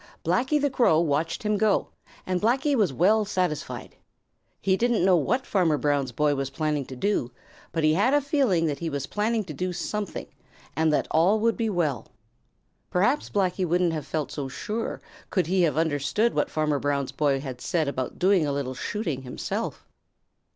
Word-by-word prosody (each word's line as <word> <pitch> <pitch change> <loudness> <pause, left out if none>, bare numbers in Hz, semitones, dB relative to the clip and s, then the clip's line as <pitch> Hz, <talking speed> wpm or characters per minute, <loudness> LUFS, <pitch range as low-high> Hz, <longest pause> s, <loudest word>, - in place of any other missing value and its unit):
Blacky 265 +5 +2
the 285 -1 +1
Crow 235 -11 +4
watched 165 +2 0
him 210 -1 +1
go, 215 0 +2 0.4
and 185 -1 -1
Blacky 260 +6 +2
was 210 - +2
well 200 - +3
satisfied. 180 -7 -3 0.6
He 190 -1 +2
didn't 230 -3 +2
know 190 -1 +5
what 215 - +1
Farmer 170 -6 +2
Brown's 145 -3 0
boy 145 +5 +2
was 135 -1 -2
planning 150 -1 -1
to 130 - -9
do, 130 -4 0 0.4
but 165 -1 -1
he 155 0 +4
had 205 +10 +3
a 290 - +4
feeling 265 - +1
that 145 -3 -2
he 165 - -2
was 140 -2 -3
planning 215 +4 0
to 170 -5 -8
do 180 +5 -2
something, 205 +3 -4 0.5
and 160 +1 +2
that 150 - +1
all 180 +7 +4
would 230 0 +2
be 225 -2 -1
well. 165 -9 -1 0.8
Perhaps 210 +11 +1
Blacky 190 -2 0
wouldn't 175 0 +2
have 155 -2 -4
felt 155 -3 -2
so 140 -2 -4
sure 215 - -4 0.3
could 185 -3 +1
he 185 +3 +1
have 155 -4 +2
understood 160 +8 +1
what - - 0
Farmer 150 -2 0
Brown's 140 -1 -1
boy 140 -3 +1
had 130 -3 -7
said 160 -4 0
about 130 -2 -3
doing 185 -2 +3
a - - 0
little 140 -2 -2
shooting 160 - -3
himself. 125 -1 -4
170 Hz, 185 wpm, -26 LUFS, 145-210 Hz, 0.8 s, know